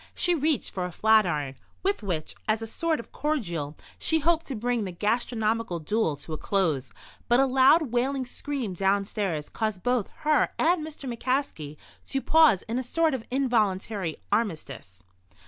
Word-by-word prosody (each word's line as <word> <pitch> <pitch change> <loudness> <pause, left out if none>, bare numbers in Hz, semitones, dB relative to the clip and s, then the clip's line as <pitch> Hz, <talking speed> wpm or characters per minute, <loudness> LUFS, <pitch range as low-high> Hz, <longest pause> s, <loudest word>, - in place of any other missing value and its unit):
She 355 - +2
reached 310 -2 0
for 185 - -2
a 180 - -5
flatiron, 175 -11 +2 0.3
with 395 -5 0
which, 175 -7 -3
as 220 +1 +1
a - - -3
sort 320 +8 -1
of 235 - -10
cordial, 170 - -2 0.2
she 320 - +3
hoped 330 +1 +1
to 270 - -3
bring 240 0 0
the 190 - -4
gastronomical 220 0 0
duel 165 0 0
to 155 +3 -8
a 155 - -4
close. 155 - 0 0.4
But 240 +1 +4
a 270 - +5
loud, 265 +2 +4
wailing 260 +2 0
scream 250 -4 -4
downstairs 195 -4 0
caused 215 -4 -3
both 245 -4 +1
her 305 -1 +2
and 335 0 +2
Mr. 305 -3 -7
McCaskey 240 - -2 0.3
to 270 - -1
pause 315 - +5
in 230 +3 -2
a - - 0
sort 320 +5 +1
of 250 -4 -4
involuntary 210 - 0
armistice. 135 - -3
225 Hz, 165 wpm, -27 LUFS, 185-270 Hz, 0.4 s, a